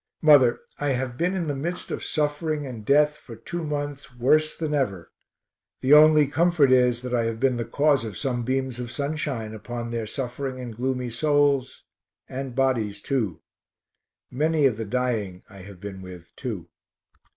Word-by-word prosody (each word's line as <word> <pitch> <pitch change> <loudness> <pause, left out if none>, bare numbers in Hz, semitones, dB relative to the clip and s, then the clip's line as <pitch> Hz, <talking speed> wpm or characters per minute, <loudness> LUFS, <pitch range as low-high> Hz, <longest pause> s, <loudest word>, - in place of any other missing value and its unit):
Mother, 140 -6 +6 0.2
I 145 -2 +1
have 125 -1 -3
been 180 +8 0
in 180 -3 -1
the 145 -2 -2
midst 170 +6 -4
of - - -4
suffering 150 0 -1
and 120 -5 -7
death 150 +5 +3
for 115 - -11
two 170 +10 -6
months 145 -3 -4
worse 155 +6 +2
than 155 -2 -2
ever 100 - -1 0.7
the 135 +3 +4
only 155 0 +7
comfort 160 -1 +3
is 125 -1 +3
that 125 -1 -4
I 120 -2 +2
have 115 0 -3
been 130 -1 +2
the 115 - -2
cause 140 +2 +2
of 110 -5 -6
some 125 -3 -1
beams 130 0 -2
of 120 -1 -5
sunshine 140 -5 -3
upon 120 +2 -6
their 115 -2 -3
suffering 130 +2 -4
and 120 -3 -7
gloomy 125 0 -2
souls, 145 0 +1 0.4
and 130 -1 -6
bodies 120 -7 0
too. 110 - -2 0.9
Many 155 +2 +2
of 125 -6 +2
the 115 - -4
dying 105 -5 -2
I 100 - -14
have 95 0 -12
been 95 -1 -7
with, 90 -2 -12
too. 105 -11 -5
130 Hz, 175 wpm, -25 LUFS, 115-145 Hz, 0.9 s, only